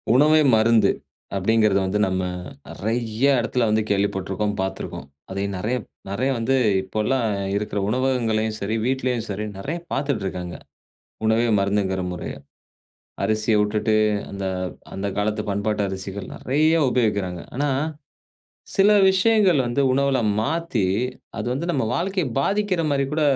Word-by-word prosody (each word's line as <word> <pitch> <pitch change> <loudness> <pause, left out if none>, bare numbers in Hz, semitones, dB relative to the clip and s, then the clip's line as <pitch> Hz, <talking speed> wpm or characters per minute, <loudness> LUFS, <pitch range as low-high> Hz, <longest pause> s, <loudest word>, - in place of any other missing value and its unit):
உணவே 155 +3 +6
மருந்து 110 -2 +4 0.5
அப்டீங்கிறது 105 0 +3
வந்து, 100 +3 0
நம்ம 95 0 -1 0.5
நெறைய 115 +2 -3 0.2
எடத்துல 120 +1 0
வந்து 110 +1 +2
கேள்விப்பட்டிருக்கோம், 100 0 0
பாத்துருக்கோம். 95 -7 -5 0.2
அதையும் 100 +1 -3
நெறைய 115 +7 -1 0.3
நெறைய 115 +7 0
வந்து 115 +4 +1 0.3
இப்போலாம் 110 +6 -1 0.3
இருக்குற 105 0 -2
உணவகங்களையும் 115 -3 0
சரி, 105 +3 -1
வீட்லயும் 125 -3 0
சரி, 105 +1 -3
நெறைய 150 - -3 0.2
பாத்துட்டுருக்காங்க, 100 -11 -2 0.7
உணவே 110 +2 +3
மருந்துங்குற 100 -1 0
முறைய. 90 - -5 0.9
அரிசிய 110 +1 +1
வுட்டுட்டு 105 +1 +1 0.4
அந்த 100 -1 -5 0.5
அந்த 95 +1 -3
காலத்து 105 +1 0
பண்பாட்டு 105 +1 0
அரிசிகள் 95 0 -5
நெறைய 155 +5 +2 0.2
உபயோகிக்கிறாங்க. 100 -8 0 0.2
ஆனா, 145 +2 +1 1.1
சில 200 +2 +6 0.2
விஷயங்கள் 190 -4 +4
வந்து 120 +4 +1
உணவுல 135 0 +2 0.2
மாத்தி, 150 - 0 0.5
அது - - -3
வந்து 145 +6 -3
நம்ம 135 -7 0
வாழ்க்கைய 185 +3 0
பாதிக்கிற 200 +2 +1
மாரி 140 -1 +2
கூட 155 +1 +1
110 Hz, 120 wpm, -23 LUFS, 100-135 Hz, 1.1 s, உணவே